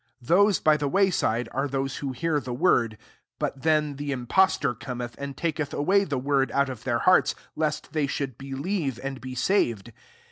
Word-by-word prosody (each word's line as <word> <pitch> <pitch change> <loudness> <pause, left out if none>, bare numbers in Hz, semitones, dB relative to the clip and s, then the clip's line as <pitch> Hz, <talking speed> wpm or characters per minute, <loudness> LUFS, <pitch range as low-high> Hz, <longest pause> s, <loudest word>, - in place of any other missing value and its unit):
H 120 - -18
Those 200 +2 +5
by 155 -1 +4
the 145 - -1
way 195 +5 +3
«We 115 +2 0
are 135 +2 -1
those 135 0 -2
who 140 -2 -3
hear 160 +5 -1
ihe 135 -4 -5
word: 120 -5 +2 0.4
but 135 - -3
then 150 -2 +1
the 145 0 -4
itnpostof 130 - +1
coraeth, 120 -2 -5
and 140 -1 -6
taketh 155 -3 -2
awav 195 +5 +2
the 140 - 0
word 135 +1 +1
out 140 0 +2
of 130 -4 -6
thek 120 -2 0
hearts, 185 - +4 0.2
lest 150 0 -2
they 150 -3 +1
should 135 -3 -3
believe 135 - -3
and 135 -1 -5
be 130 0 -7
saved. 120 - 0
140 Hz, 190 wpm, -26 LUFS, 130-155 Hz, 0.4 s, Those